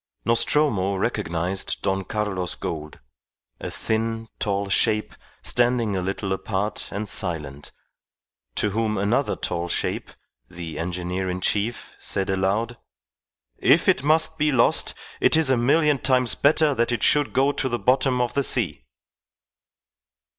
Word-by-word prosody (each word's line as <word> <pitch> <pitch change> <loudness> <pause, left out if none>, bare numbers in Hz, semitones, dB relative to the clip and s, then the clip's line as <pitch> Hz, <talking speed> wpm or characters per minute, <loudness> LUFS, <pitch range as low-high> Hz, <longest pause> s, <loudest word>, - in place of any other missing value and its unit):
Nostromo 115 -4 +2
recognized 90 +1 -2
Don 95 0 0
Carlos 95 -3 -2
Gould, 75 -1 -6 0.6
a - - -5
thin, 115 0 -2
tall 100 -1 -1
shape 105 +2 +1 0.3
standing 120 -4 +1
a 95 - -1
little 95 +1 -2
apart 95 +2 -3
and 105 +2 -4
silent, 75 -8 -4 0.8
to 105 - +1
whom 110 0 0
another 100 +2 +1
tall 85 +1 -2
shape, - - -2 0.4
the 85 -3 -7
engineer 90 +2 -3
in 90 0 -2
chief, 105 +5 -2
said 95 0 -1
aloud, 100 +5 0 0.8
"If - - +4
it - - +4
must 160 +1 +3
be 150 0 +3
lost, 125 -4 +2 0.2
it - - +4
is 155 -4 +3
a - - +5
million 145 +3 +3
times 125 -3 +2
better 150 +1 +3
that 120 -1 0
it 120 - -1
should 145 -1 +3
go 135 +2 +3
to 135 -2 -1
the 120 - -1
bottom 130 0 +2
of 120 - -1
the 140 - +1
sea." 85 - 0
105 Hz, 140 wpm, -24 LUFS, 95-125 Hz, 0.8 s, a